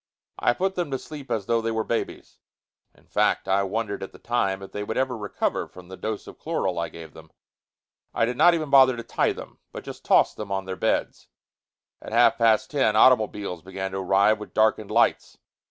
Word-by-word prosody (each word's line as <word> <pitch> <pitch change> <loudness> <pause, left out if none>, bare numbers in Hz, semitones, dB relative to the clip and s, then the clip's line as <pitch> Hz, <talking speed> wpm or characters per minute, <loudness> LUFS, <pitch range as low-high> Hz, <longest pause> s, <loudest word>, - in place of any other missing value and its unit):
I 120 - +3
put 190 +1 -1
them 175 -4 -2
to 135 - -2
sleep 145 0 -10
as 105 -4 -2
though 115 +1 +1
they 115 - -2
were 110 -1 -1
babies. 115 - -4 0.6
In - - -25
fact, - - 0
I 95 +1 +2
wondered 100 +1 -3
at 95 - -6
the - - -14
time 100 -5 -1
if 95 - -10
they 105 - -4
would 110 - -4
ever 130 -1 0
recover 105 -3 -2
from 90 -1 -14
the 95 - -8
dose 110 +2 -5
of - - -12
chloral 95 - -2
I 85 - -2
gave 80 -2 -11
them. 80 0 -15 0.8
I - - +1
did 125 +2 -3
not 175 +7 +5
even 155 -4 -4
bother 130 -2 +6
to 115 - -6
tie - - 0
them, - - -11
but - - -8
just - - -9
tossed - - +3
them 105 -2 -6
on 95 -1 -2
their 95 0 -5
beds. - - -1 0.7
At - - -9
half 120 +1 +4
past 115 -2 +3
ten, 135 -7 +2
automobiles 105 -7 +3
began 95 +1 -5
to 95 - -4
arrive 100 +3 +3
with 105 - -10
darkened 110 -1 +2
lights. - - +1
110 Hz, 215 wpm, -25 LUFS, 95-120 Hz, 0.8 s, bother